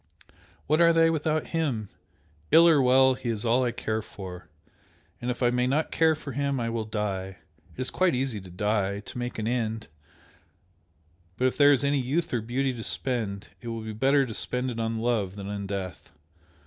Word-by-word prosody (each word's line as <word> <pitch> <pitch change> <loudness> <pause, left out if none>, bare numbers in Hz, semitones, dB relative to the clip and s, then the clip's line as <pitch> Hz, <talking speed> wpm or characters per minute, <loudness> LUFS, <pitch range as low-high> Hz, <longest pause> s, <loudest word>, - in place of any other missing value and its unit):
what 155 +4 +2
are 170 0 +7
they 165 0 +4
without 155 0 0
him? 135 -10 -1 0.6
Ill 165 +1 +7
or 155 -4 +5
well, 130 +1 +5
he 125 -1 -5
is 110 0 -2
all 120 +3 +3
I 120 - 0
care 110 -1 -2
for, 95 -4 -10 0.7
and 120 - -3
if 125 +1 -2
I 120 - +4
may 125 0 +1
not 150 +5 0
care 160 -1 +3
for 150 -2 -8
him 140 0 -1
I 115 -1 -2
will 115 -1 -2
die! 100 -3 -3 0.4
It - - -4
is 130 - -3
quite 185 -6 +2
easy 125 -5 -2
to 95 - -12
die 100 +1 -1
to 110 - -10
make 120 0 -4
an 110 -1 -2
end! 115 -5 -2 1.5
but 130 - 0
if 130 - +2
there 145 0 +6
is 140 -1 +3
any 140 0 +2
youth 140 +6 -1
or 120 - 0
beauty 130 +4 -1
to 115 -2 -7
spend, 110 -7 0
it 120 - -9
will 115 -1 -4
be 110 0 -6
better 135 +5 +3
to 115 - -6
spend 125 +3 0
it 115 - -6
on 115 0 -1
love 110 -5 -1
than 100 -1 -7
in 100 -1 -4
death! 95 -4 -6
120 Hz, 205 wpm, -27 LUFS, 110-135 Hz, 1.5 s, are